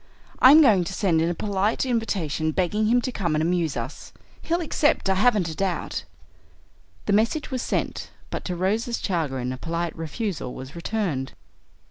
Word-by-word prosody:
"I'm 295 +5 +9
going 205 -9 +5
to 190 - -5
send 170 -6 +2
in 165 - +1
a 175 - -2
polite 205 +5 0
invitation 195 - -1
begging 190 +6 0
him 245 +2 +4
to 255 - -2
come 175 -9 -1
and 155 - +1
amuse 170 -3 0
us. - - -6 0.3
He'll 340 +1 0
accept, 295 - +1
I - - +5
haven't 205 -2 +3
a 160 - -4
doubt." 190 -1 -2 1.0
The 205 - +1
message 230 +9 +1
was 255 -2 -2
sent, - - -2 0.2
but - - -4
to 180 - -2
Rose's 220 +7 0
chagrin 135 - -2
a - - -6
polite 170 +3 -3
refusal 165 - -4
was 130 +3 -9
returned. 170 -7 -2
190 Hz, 170 wpm, -24 LUFS, 165-225 Hz, 1.0 s, I'm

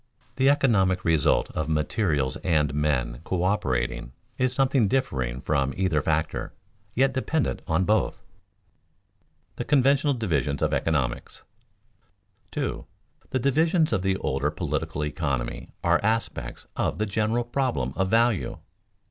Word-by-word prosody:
The 135 0 +4
economic 100 -10 +2
result 80 -4 +2
of 80 0 -3
materials 75 - 0
and 75 -6 +1
men 70 -5 0
coöperating 70 -11 -1 0.3
is 130 0 +2
something 130 -3 +2
differing 65 - -1
from 70 0 0
either 90 -5 +1
factor, 80 +2 -1 0.4
yet 135 +2 +3
dependent 140 +3 -1
on 80 +3 +2
both. 105 0 +2
[Sidenote: 95 +2 -39
The - - -3
conventional 140 +1 +3
divisions 75 - -1
of - - +1
economics] 70 -7 -1 1.1
2. - - -3 0.4
_The 130 - -1
divisions 160 +3 +3
of 95 - +1
the 95 0 +1
older - - -1
political 75 - -2
economy 70 -4 -3
are - - +4
aspects 110 - -2
of - - -1
the 110 - 0
general 110 +3 0
problem 120 - -1
of 95 +2 +1
value. 115 0 +2
95 Hz, 125 wpm, -26 LUFS, 75-120 Hz, 1.1 s, The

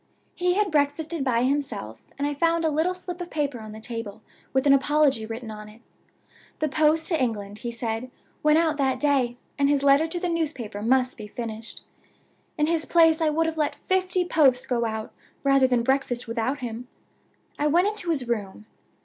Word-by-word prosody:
He 360 0 +1
had 415 -2 +1
breakfasted 300 +1 0
by 245 -3 +1
himself, 255 - -2 0.2
and 280 - -1
I 290 - -1
found 330 +3 +1
a 315 - +2
little 325 +5 +1
slip 360 -1 -6
of 350 - -6
paper 285 -5 -2
on 215 -1 -9
the 215 - -9
table 220 -2 -6 0.3
with 265 +1 +1
an 280 - +6
apology 275 -4 +2
written 225 0 -6
on 210 0 -9
it. 215 +2 -16 0.8
The 310 - 0
post 310 +2 +2
to 325 -5 +1
England, 210 -4 -2
he 240 - -4
said, 230 +1 -4 0.3
went 300 0 +4
out 320 -2 +2
that 265 -2 +1
day 260 -4 +2 0.2
and 280 0 +3
his 285 -1 +2
letter 280 +3 +5
to 350 +2 -3
the 360 - -2
newspaper 290 -11 -3
must 255 +3 +2
be 210 - -7
finished. 225 0 -7 0.8
In 300 - +3
his 320 -1 0
place 325 -1 +4
I 315 - +3
would 325 +2 +1
have 325 -1 -3
let 295 -1 0
fifty 370 -1 0
posts 265 -7 +3
go 240 -3 0
out 220 -1 -4 0.3
rather 275 -1 +4
than 245 -2 +1
breakfast 260 -2 0
without 235 +4 -2
him. 240 0 -5 0.7
I 295 - +2
went 345 +6 +3
into 415 -4 -3
his 275 -7 0
room. 210 -3 -3
275 Hz, 195 wpm, -25 LUFS, 235-320 Hz, 0.8 s, an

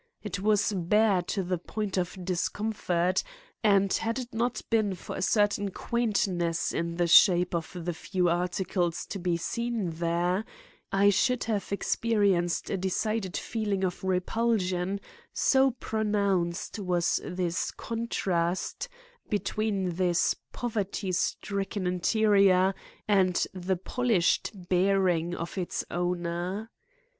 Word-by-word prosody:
It 200 -3 -4
was 210 +1 +2
bare 195 +2 +3
to 190 +2 -2
the 180 -1 -2
point 205 +2 -4
of 180 0 -2
discomfort, 185 -1 0 0.4
and 200 -2 +4
had 230 +2 0
it 250 -2 -6
not 235 +2 -1
been 215 -4 +2
for 180 - -7
a - - -4
certain 205 +1 +2
quaintness 190 -7 0
in 170 0 -2
the 175 0 +1
shape 180 +1 +6
of 165 -2 -2 0.2
the 175 - -1
few 180 +2 -1
articles 175 0 -1
to 200 - -6
be 175 -1 0
seen 230 0 -2
there, 170 +4 0 0.5
I 200 +1 +5
should 250 +5 +2
have 210 -4 -2
experienced 200 -4 +1
a 195 - 0
decided 190 +1 -1
feeling 205 -4 -2
of 180 0 -2
repulsion, 190 0 0 0.3
so 270 0 +4
pronounced 205 -7 -1
was 180 -3 +1
the 175 -2 -2 0.2
contrast 195 - -2 0.4
between 205 -4 -1
this 175 -2 +2 0.2
poverty 205 -4 -3
stricken 195 +2 -2
interior 195 0 +3 0.3
and 190 -4 +3
the 185 0 -1
polished 220 -2 +1 0.2
bearing 180 -2 +2
of 170 +3 -5
its 180 - -3
owner. 175 +4 -2
190 Hz, 120 wpm, -28 LUFS, 175-210 Hz, 0.5 s, shape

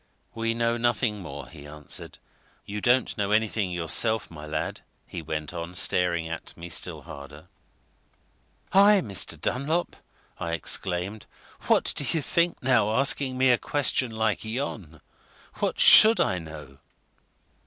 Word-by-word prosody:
"We 115 0 -2
know 115 0 0
nothing 115 -3 -1
more," 70 -6 -9
he 75 0 -13
answered. 75 -1 -5 0.5
"You 105 +1 -6
don't 125 +2 +1
know 100 -1 -1
anything 105 -2 0
yourself, 90 +5 +1
my 75 -2 -10
lad?" 75 0 -4 0.2
he - - -7
went 75 0 -5
on, 85 +1 -7
staring 85 -2 +2
at 80 0 -8
me 85 +1 -9
still - - -2
harder. 75 +4 -12 1.2
"I, 200 +1 +6
Mr. 100 -5 -3
Dunlop!" 155 +7 -2 0.4
I 85 0 -4
exclaimed. 95 +4 -1 0.4
"What - - +2
do - - +1
you 155 +2 -2
think, 170 0 -1
now, 110 -4 +2
asking 135 0 +1
me 130 0 +4
a 120 - +2
question 135 -3 0
like 110 -1 -2
yon! 110 - -6 0.6
What - - -2
should 220 +1 +8
I 90 - 0
know?" 75 -4 -11
105 Hz, 140 wpm, -25 LUFS, 80-120 Hz, 1.2 s, should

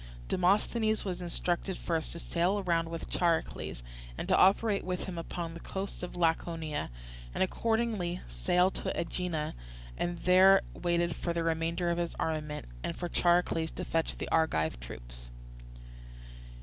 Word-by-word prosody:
Demosthenes 215 +4 +2
was 180 -2 -3
instructed 175 +1 -1
first 165 -2 -1
to - - -7
sail 180 +5 +1
round 165 -2 +1
with 165 0 -5
Charicles 165 - 0 0.3
and - - -4
to - - +4
operate 200 +2 +4
with 180 -1 -2
him 185 - -5
upon 165 0 -4
the 170 - -8
coasts 195 +3 -5
of 180 - -5
Laconia, 165 -2 0 0.5
and - - +3
accordingly 220 -3 0
sailed 175 - +2
to - - -1
Aegina 170 -3 -2 0.5
and 175 0 -1
there 190 +2 +7
waited 170 -1 0
for 170 - -2
the 170 0 0
remainder 165 +1 0
of 170 - 0
his 170 -1 -2
armament, 150 -2 -2 0.2
and - - -2
for 175 - -3
Charicles 175 -2 +2
to - - -4
fetch 165 0 0
the - - -4
Argive 80 - +2
troops. - - -6
175 Hz, 150 wpm, -31 LUFS, 165-185 Hz, 0.5 s, there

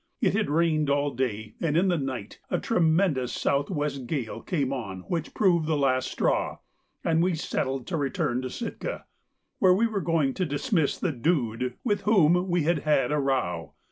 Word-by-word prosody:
It - - +2
had 210 +1 0
rained 155 -1 +2
all 145 0 +1
day, 110 -4 -3
and 160 -2 +1
in 185 +3 +3
the 175 - +2
night 130 -6 -5
a - - +1
tremendous 160 - +2
south 140 0 0
west 145 -6 -2
gale 130 -7 -3
came 140 -7 -1
on 100 -8 -5
which 165 - -4
proved 175 -6 +3
the 160 -2 +1
last 130 -2 +1
straw, - - 0 0.5
and 165 0 +2
we 180 0 +2
settled 135 -5 -2
to 170 - -2
return 130 -3 -1
to 130 - -4
Sitka, 230 - -5 0.5
where 185 -1 +5
we 225 +5 +3
were 215 -4 -1
going 155 -5 +1
to 185 - -1
dismiss 155 - 0
the 180 - -1
Dude, 125 -4 -1
with 205 -4 0
whom 180 -3 +3
we 175 -2 +2
had 165 0 +2
had 150 -3 +2
a 150 - +1
row. 90 - -1
150 Hz, 185 wpm, -27 LUFS, 130-175 Hz, 0.5 s, where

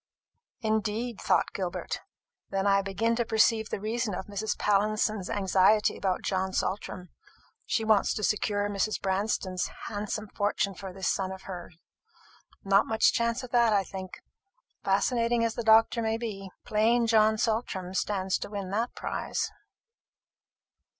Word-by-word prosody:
"Indeed!" 220 +1 -1
thought - - +2
Gilbert. 180 -2 -3 0.5
"Then 195 0 -1
I 200 0 +4
begin 200 +4 0
to 240 - +2
perceive 220 -1 +2
the - - -3
reason 220 0 -2
of 185 - -5
Mrs. 205 +1 -3
Pallinson's 210 -1 +1
anxiety 200 +1 +3
about 190 -2 -1
John 190 0 -1
Saltram. 185 -2 -3 0.6
She 225 - 0
wants 215 -2 +3
to 210 - -4
secure 205 0 +1
Mrs. 205 +1 -1
Branston's 190 -1 -1 0.2
handsome 210 0 -4
fortune 205 -1 0
for 190 0 -8
this 190 -1 -4
son 190 -1 0
of 190 0 -8
hers. 175 -3 -8 0.9
Not 195 +1 +4
much 220 0 +3
chance 235 +1 0
of 250 - -8
that, 235 -3 +4
I 200 -1 +3
think, 190 -1 -8 0.6
fascinating 230 +4 +2
as 225 - -1
the 235 - -3
doctor 225 +1 +5
may 225 0 0
be. 205 -4 -5 0.2
Plain 230 +3 +3
John 220 -1 +4
Saltram 215 -5 -1
stands 190 -1 0
to - - -6
win 200 -2 -5
that 230 +4 -1
prize." - - -3
210 Hz, 145 wpm, -28 LUFS, 195-225 Hz, 0.9 s, doctor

